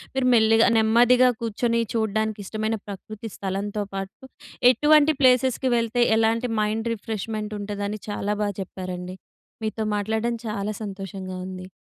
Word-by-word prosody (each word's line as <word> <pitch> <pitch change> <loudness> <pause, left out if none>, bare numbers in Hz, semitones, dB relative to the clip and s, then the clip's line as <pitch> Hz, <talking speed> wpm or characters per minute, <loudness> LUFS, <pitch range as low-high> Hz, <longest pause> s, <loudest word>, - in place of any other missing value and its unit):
మీరు 265 -1 +1
మెల్లిగా, 225 0 +5
నెమ్మదిగా 240 +3 +5
కూర్చొని 230 +1 0
చూడ్డానికి 220 -1 -1
ఇష్టమైన 215 +2 -2
ప్రకృతి 215 +3 -8
స్థలంతో 200 +2 -3
పాటు 195 +6 -6 0.5
ఎటువంటి 300 +3 +4
ప్లేసెస్‌కి 255 0 +3
వెళ్తే, 230 +1 0 0.2
ఎలాంటి 230 +2 +1
మైండ్ 220 +2 -1
రిఫ్రెష్మెంట్ 215 -1 -4
ఉంటదని 205 +1 -4
చాలా 205 0 -1
బాగా 205 -2 -1
చెప్పారండి. 185 -1 -6 0.5
మీతో 220 0 -2
మాట్లాడడం 220 +3 -1
చాలా 210 -1 -2
సంతోషంగా 195 -2 -6
ఉంది. 185 -1 -7
220 Hz, 120 wpm, -24 LUFS, 200-230 Hz, 0.5 s, మెల్లిగా